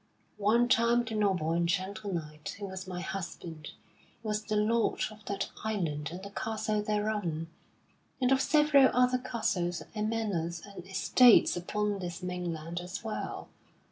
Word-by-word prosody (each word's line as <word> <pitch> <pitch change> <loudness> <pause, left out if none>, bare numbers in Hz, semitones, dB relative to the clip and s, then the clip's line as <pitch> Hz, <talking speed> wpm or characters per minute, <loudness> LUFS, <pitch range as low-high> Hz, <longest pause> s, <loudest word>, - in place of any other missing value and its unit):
One 225 +4 +4
time 235 0 +4
the 225 - -5
noble 190 -7 +1
and 170 0 +1
gentle 200 +3 -2
knight 155 -3 -5
who 205 - -5
was 190 -1 -6
my 180 -1 -4
husband 170 -4 -6 0.6
was 215 -1 -1
the 215 -1 -2
lord 220 +2 +2
of 215 0 -14
that 200 -1 -3
island 165 -9 -2
and 180 +2 -7
the 200 - -8
castle 215 0 -1
thereon, 210 -6 -1 0.7
and 255 -1 +2
of 265 0 +4
several 295 -3 +5
other 250 0 +4
castles 185 -8 -1
and 215 0 -1
manors 175 -7 -2
and 200 -3 -10
estates 220 +5 +5
upon 205 +3 -1
this 175 0 -5
mainland 175 -2 -3
as 180 +4 -6
well. 220 -1 -4
200 Hz, 150 wpm, -30 LUFS, 175-220 Hz, 0.7 s, several